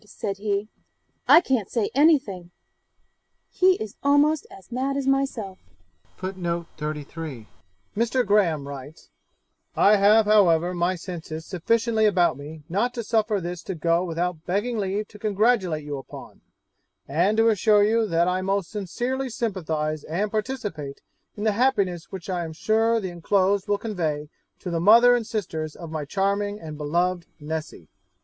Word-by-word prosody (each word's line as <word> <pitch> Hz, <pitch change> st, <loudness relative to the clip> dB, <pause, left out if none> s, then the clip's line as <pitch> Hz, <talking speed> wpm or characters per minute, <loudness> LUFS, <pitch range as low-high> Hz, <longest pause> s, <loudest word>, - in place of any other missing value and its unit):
said 200 Hz, -1 st, -5 dB
he, 205 Hz, 0 st, -1 dB, 0.6 s
"I 335 Hz, -, +8 dB
can't 255 Hz, -, -1 dB
say 225 Hz, -4 st, -1 dB
anything"; 265 Hz, -, +2 dB, 1.0 s
he 370 Hz, 0 st, +4 dB
is 215 Hz, -, -7 dB
almost 290 Hz, +2 st, +3 dB
as 190 Hz, +2 st, -15 dB
mad 265 Hz, +3 st, -1 dB
as 275 Hz, -, -2 dB
myself.' 270 Hz, -8 st, -1 dB, 0.6 s
Mr. 175 Hz, -3 st, -3 dB, 1.6 s
Graham 175 Hz, -9 st, +2 dB
writes, 140 Hz, +2 st, -10 dB, 0.7 s
'I 210 Hz, -, +5 dB
have 210 Hz, +2 st, +5 dB
however 180 Hz, -5 st, +4 dB
my 175 Hz, +1 st, 0 dB
senses 160 Hz, -3 st, -7 dB
sufficiently 220 Hz, +4 st, +1 dB
about 180 Hz, -8 st, +3 dB
me 150 Hz, +3 st, -10 dB
not 230 Hz, +8 st, -1 dB
to 235 Hz, -, -3 dB
suffer 215 Hz, -1 st, +1 dB
this 175 Hz, -1 st, -5 dB
to 190 Hz, +2 st, -5 dB
go 170 Hz, +2 st, +1 dB
without 170 Hz, -1 st, -3 dB
begging 210 Hz, +5 st, -1 dB
leave 200 Hz, +1 st, -2 dB
to 210 Hz, -, -14 dB
congratulate 205 Hz, -6 st, +1 dB
you 145 Hz, -1 st, -5 dB
upon, 135 Hz, -, -12 dB, 0.7 s
and 175 Hz, +10 st, +1 dB
to 225 Hz, +1 st, +5 dB
assure 210 Hz, 0 st, +4 dB
you 220 Hz, +1 st, +2 dB
that 170 Hz, -1 st, +2 dB
I 180 Hz, +1 st, 0 dB
most 195 Hz, -1 st, -1 dB
sincerely 245 Hz, +6 st, -3 dB
sympathize 160 Hz, -10 st, -2 dB
and 200 Hz, +6 st, -2 dB
participate 210 Hz, -, -4 dB, 0.4 s
in 205 Hz, -, -4 dB
the 220 Hz, -, +3 dB
happiness 200 Hz, -7 st, +1 dB
which 190 Hz, -3 st, -7 dB
I 180 Hz, -3 st, -2 dB
am 160 Hz, -1 st, -6 dB
sure 225 Hz, +7 st, +2 dB
the 190 Hz, -4 st, -4 dB
enclosed 190 Hz, +3 st, +1 dB
will 205 Hz, 0 st, +1 dB
convey 160 Hz, -9 st, -3 dB, 0.3 s
to 180 Hz, -, -5 dB
the 165 Hz, -, 0 dB
mother 235 Hz, +7 st, +7 dB
and 235 Hz, -3 st, -2 dB
sisters 160 Hz, -9 st, -4 dB
of 165 Hz, -3 st, -9 dB
my 155 Hz, -2 st, -3 dB
charming 200 Hz, +5 st, -1 dB
and 155 Hz, -4 st, -8 dB
beloved 170 Hz, +4 st, -1 dB
Nessy.' 150 Hz, -, -6 dB
195 Hz, 150 wpm, -24 LUFS, 170-220 Hz, 1.6 s, I